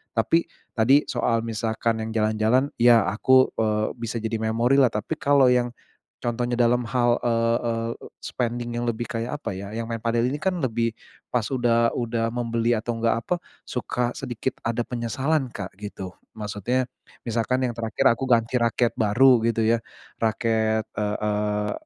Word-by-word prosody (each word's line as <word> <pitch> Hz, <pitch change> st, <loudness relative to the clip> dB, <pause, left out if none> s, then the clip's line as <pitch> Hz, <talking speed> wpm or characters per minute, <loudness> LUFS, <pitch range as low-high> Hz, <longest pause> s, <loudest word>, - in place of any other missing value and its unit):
tapi 165 Hz, +10 st, +2 dB, 0.3 s
tadi 135 Hz, +6 st, +5 dB
soal, 115 Hz, -1 st, +1 dB
misalkan 115 Hz, 0 st, -1 dB
yang 110 Hz, 0 st, -4 dB
jalan-jalan, 110 Hz, +5 st, +2 dB
ya, 115 Hz, -2 st, +6 dB
aku, 130 Hz, +5 st, +4 dB
eee, 110 Hz, -1 st, +1 dB
bisa 115 Hz, -1 st, -4 dB
jadi 110 Hz, 0 st, -2 dB
memorilah. 120 Hz, +4 st, +3 dB
Tapi, 105 Hz, +9 st, -3 dB
kalau 140 Hz, -3 st, +4 dB
yang 120 Hz, -1 st, +1 dB, 0.5 s
contohnya 120 Hz, +1 st, -1 dB
dalam 120 Hz, 0 st, +2 dB
hal, 120 Hz, 0 st, +2 dB
eee, 115 Hz, 0 st, +1 dB
eee, 115 Hz, 0 st, -1 dB, 0.3 s
spending 120 Hz, -1 st, -3 dB
yang 120 Hz, -, -2 dB
lebih, 120 Hz, 0 st, -2 dB
kayak, 115 Hz, +3 st, -3 dB
apa -, -, -3 dB
ya, 100 Hz, +2 st, -7 dB
yang 115 Hz, 0 st, -4 dB
main 115 Hz, -, -2 dB
padel, 115 Hz, +1 st, 0 dB
ini 145 Hz, -, -2 dB
kan, 190 Hz, +4 st, 0 dB
lebih 115 Hz, -2 st, 0 dB, 0.4 s
pas, 125 Hz, -3 st, +2 dB
udah 115 Hz, -3 st, +2 dB
udah 115 Hz, -1 st, -1 dB
membeli, 115 Hz, -1 st, 0 dB
atau 115 Hz, +2 st, -3 dB
enggak, 115 Hz, 0 st, 0 dB
apa, 180 Hz, -, +1 dB, 0.3 s
suka 125 Hz, 0 st, -2 dB
sedikit 130 Hz, 0 st, -4 dB
ada 115 Hz, +1 st, -1 dB
penyesalan 130 Hz, +4 st, -1 dB
Kak, 100 Hz, -4 st, -7 dB
gitu. 95 Hz, -3 st, -7 dB, 0.2 s
Maksudnya, 105 Hz, +5 st, -1 dB, 0.4 s
misalkan 120 Hz, +3 st, 0 dB
yang 120 Hz, -, -2 dB
terakhir 115 Hz, +4 st, -2 dB
aku 135 Hz, -, -4 dB
ganti 115 Hz, -1 st, +3 dB
raket 120 Hz, 0 st, +1 dB
baru, 120 Hz, +3 st, +4 dB
gitu 115 Hz, -1 st, 0 dB
ya, 115 Hz, +1 st, +2 dB, 0.4 s
raket, 110 Hz, -1 st, +1 dB
eee, 105 Hz, 0 st, -1 dB
eee, 105 Hz, 0 st, 0 dB
115 Hz, 160 wpm, -24 LUFS, 110-125 Hz, 0.5 s, ya